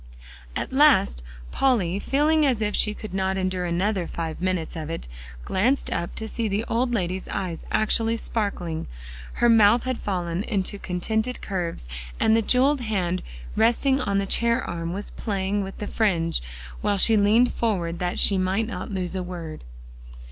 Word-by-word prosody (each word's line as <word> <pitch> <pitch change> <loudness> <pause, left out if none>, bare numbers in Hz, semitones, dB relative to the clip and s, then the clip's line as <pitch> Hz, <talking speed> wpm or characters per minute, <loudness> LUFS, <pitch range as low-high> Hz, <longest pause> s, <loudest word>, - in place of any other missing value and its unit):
At - - -3
last 265 - +4 0.3
Polly, 200 -9 +2
feeling 300 +6 +2
as 260 -6 +2
if 210 -1 0
she 210 0 +1
could 215 -4 -8
not 190 0 0
endure 185 -1 -1
another 180 +2 0
five 165 0 -5
minutes 185 -3 -1
of 155 -1 -5
it, 165 - -5 0.4
glanced 245 +9 +1
up 170 - -3
to 220 - -4
see 225 +1 -2
the 210 +2 -1
old 245 +2 0
lady's 185 -4 -2
eyes 175 -4 -4
actually 225 +1 +2
sparkling; 190 - -2 0.5
her 240 - +2
mouth 225 0 +6
had 255 -1 -2
fallen 180 -3 -2
into 200 -2 -2
contented 220 +8 -1
curves, 175 - -4 0.3
and 220 - +4
the 225 - +3
jeweled 260 +5 +3
hand 185 -6 -1 0.3
resting 240 +5 +3
on 200 -5 0
the 200 - +1
chair 235 +4 +1
arm 170 -1 -4
was 200 +3 -5
playing 200 -1 -1
with 195 0 -7
the 210 - -4
fringe, 170 -7 +1 0.4
while 205 -1 +1
she 220 +3 +5
leaned 215 +4 +4
forward 175 -7 -1
that 180 0 -1
she 195 -2 +5
might 190 +4 +1
not 235 - -5
lose 190 -2 -3
a 185 - -1
word. 170 -3 -7
200 Hz, 170 wpm, -25 LUFS, 180-225 Hz, 0.5 s, mouth